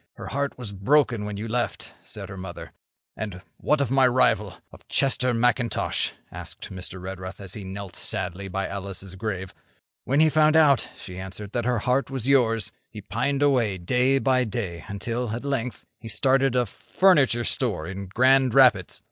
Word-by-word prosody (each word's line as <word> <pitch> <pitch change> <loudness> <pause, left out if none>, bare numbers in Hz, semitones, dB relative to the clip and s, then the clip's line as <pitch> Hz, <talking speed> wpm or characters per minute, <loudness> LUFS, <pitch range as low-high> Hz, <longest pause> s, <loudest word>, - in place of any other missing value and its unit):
'Her - - -8
heart 140 0 -2
was 120 -5 -4
broken 115 +2 +2
when 105 -1 -5
you 110 +3 -4
left,' 120 +1 -3
said 100 -2 -8
her 95 - -7
mother. 95 -2 -8 0.4
'And 100 -3 -6
what 150 - +1
of 135 - -1
my 135 -1 +5
rival—of 105 -6 0
Chester 130 -2 +2
McIntosh?' 120 0 +1 0.2
asked - - -7
Mr. 95 0 -7
Redruth, 95 0 -7
as 95 -2 -5
he 105 - -4
knelt 95 -1 -7
sadly 95 +1 -2
by 95 +1 -2
Alice's 95 -1 -6
grave. 95 -1 -4 0.5
'When 135 +3 +1
he 160 - +6
found 155 0 +4
out,' 145 -5 +4
she 95 -1 -9
answered, 95 +2 -7
'that 120 0 -2
her 125 -1 +1
heart 130 +2 +1
was 135 -3 -3
yours, 115 -5 +3 0.2
he 110 - -9
pined 135 +8 -1
away 120 -9 +2
day 125 +9 +2
by 130 -1 +2
day 95 -7 -4
until, 115 +4 -3
at 120 - -6
length, 125 -4 -3
he 115 - -9
started 130 +4 +2
a 125 -1 +3
furniture 140 -7 +2
store 110 -11 -1
in 95 +2 -6
Grand 130 +4 +3
Rapids. 125 -9 +4
115 Hz, 175 wpm, -25 LUFS, 95-130 Hz, 0.5 s, he